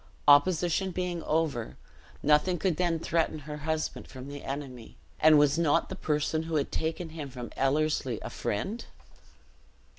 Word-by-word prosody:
Opposition 175 +5 +4
being 180 -1 -3
over, 155 -9 -1 0.5
nothing 150 +5 +3
could 175 -2 0
then 175 -2 +1
threaten 165 0 0
her 150 0 -7
husband 155 +1 -3
from 130 +1 -9
the 145 0 -8
enemy; 135 -4 -7 0.2
and 155 -1 +7
was 145 +2 +4
not 155 -4 +2
the - - -5
person 150 +1 0
who 160 0 -4
had 145 -2 0
taken 160 +1 -2
him 155 -3 -7
from 125 -2 -8
Ellerslie 135 -3 +1
a - - -6
friend? 195 - -3
155 Hz, 150 wpm, -29 LUFS, 145-165 Hz, 0.5 s, and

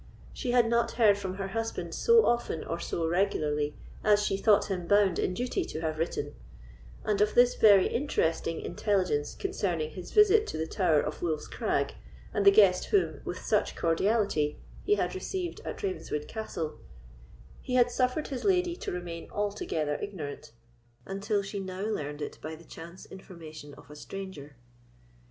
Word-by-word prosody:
She 255 - -4
had 245 -1 +4
not 235 0 +1
heard 215 -4 +5
from 190 -2 -4
her 195 0 -4
husband 225 +2 -3
so 465 -1 +5
often 235 -9 0
or 170 - -4
so 165 -1 -2
regularly 150 -5 0 0.3
as 210 -1 +4
she 195 - +1
thought 205 +1 +4
him 180 -3 -3
bound 200 -2 +4
in 180 - 0
duty 245 +3 -1
to 155 - -6
have 155 -1 -2
written, 145 -3 -2 0.7
and 205 -1 0
of 210 0 +2
this 245 0 +6
very 200 -4 +6
interesting 165 - -1
intelligence 180 -6 0
concerning 175 - -2
his 175 +3 -9
visit 425 +1 +5
to - - -4
the 160 - -1
Tower 160 -4 +2
of 150 - -5
Wolf's 160 -3 -2
Crag, - - -1 0.4
and 205 - +1
the - - +11
guest 195 -3 +5
whom, 400 -2 +1
with - - -6
such - - +1
cordiality, 165 -3 +1 0.3
he 415 - +3
had - - -1
received 375 -2 -4
at - - -6
Ravenswood 370 - -3
Castle, 165 - -5 0.8
he 255 - -3
had 245 -1 +4
suffered 255 +5 0
his 265 -3 -4
lady 360 -3 +2
to - - -4
remain 175 -2 -6
altogether 200 -7 -2
ignorant, 155 -6 -6 0.5
until 200 +1 -1
she 200 +1 -5
now 190 -1 -5
learned 150 -9 -3
it - - -7
by 155 +1 -6
the 165 +1 -15
chance 170 +4 -11
information 160 -6 -11
of - - -16
a - - -10
stranger. 150 -4 -8
195 Hz, 170 wpm, -29 LUFS, 160-225 Hz, 0.8 s, the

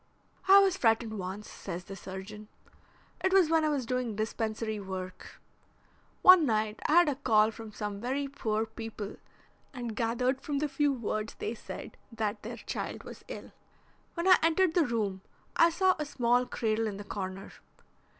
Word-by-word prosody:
"I 390 +1 +9
was 390 -2 +5
frightened 225 - +1
once," 190 +3 -5
says 180 -2 -7
the 195 +2 -9
surgeon. 195 +3 -8 0.8
"It 375 - +2
was 365 -5 +5
when 325 -1 +4
I 310 - +2
was 280 -4 -1
doing 250 -2 -2
dispensary 220 0 -2
work. 185 -1 -7 0.8
One 370 -2 +9
night 215 -4 0
I - - +2
had 345 0 +7
a - - +1
call 220 -5 +3
from 225 -1 -9
some 205 -1 -5
very 270 +4 -1
poor 220 -5 -1
people, 220 -2 -7 0.6
and 240 -3 -5
gathered 250 +3 0
from 290 -2 -2
the 300 +2 0
few 290 0 +1
words 220 -4 -3
they - - -3
said 235 - -9
that 215 -2 -2
their 230 +2 -6
child - - -5
was - - -11
ill. - - -8 0.6
When 340 +1 -1
I 370 - +8
entered 330 +1 +3
the 335 -4 +3
room 205 -5 -1 0.3
I 335 - +6
saw 370 +3 +3
a 300 - -1
small 245 -3 +1
cradle 225 -1 0
in 200 -2 -4
the 205 - -7
corner. 195 -1 -6
225 Hz, 170 wpm, -30 LUFS, 210-285 Hz, 0.8 s, I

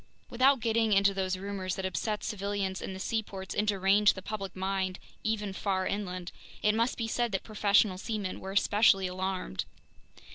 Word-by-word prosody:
Without 260 +1 +4
getting 225 -1 +2
into 195 0 +4
those 190 -1 -1
rumors 190 -1 -3
that 190 - -4
upset 210 +3 -2
civilians 200 -2 -2
in 190 - -5
the - - -7
seaports 200 -2 -3
and 210 +1 0
deranged 200 +1 +4
the 190 - -8
public 195 -4 -5
mind 190 -1 -1 0.3
even 210 -3 -1
far 190 -1 -1
inland, 185 -3 -3 0.3
it 210 - +4
must 230 +3 +1
be 230 - -2
said 240 0 0
that 195 - -1
professional 205 -3 +2
seamen 210 -3 -3
were 190 - -6
especially 200 -1 +4
alarmed. 185 - -3
195 Hz, 170 wpm, -30 LUFS, 190-215 Hz, 0.3 s, Without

